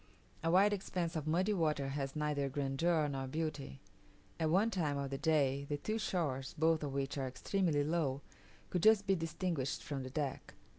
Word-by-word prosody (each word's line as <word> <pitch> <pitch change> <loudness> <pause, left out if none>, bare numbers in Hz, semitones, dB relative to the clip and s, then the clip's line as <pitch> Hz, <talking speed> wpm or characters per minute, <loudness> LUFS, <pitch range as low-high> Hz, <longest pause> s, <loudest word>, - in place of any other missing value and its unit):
A 165 - +2
wide 195 +4 +5
expanse 180 -3 -2
of 155 -1 -3
muddy 185 +6 +2
water 150 -6 0
has 135 0 -3
neither 150 -2 0
grandeur 145 +4 +1
nor 135 -2 -3
beauty. 150 - -4 0.6
At 160 -1 +1
one 200 +7 +3
time 155 -8 0
of 140 -1 -3
the 135 - -2
day, 140 -3 +2
the 145 - 0
two 215 +9 -2
shores, 145 -10 -2
both 160 0 +3
of 145 -2 -3
which 140 +1 -2
are 135 - -1
extremely 150 +3 0
low, 145 -3 0 0.5
could 180 - 0
just 215 0 +6
be 195 - +3
distinguished 165 -4 -2
from 140 -2 -4
the 130 - -6
deck. 145 0 -4
150 Hz, 185 wpm, -35 LUFS, 140-170 Hz, 0.6 s, just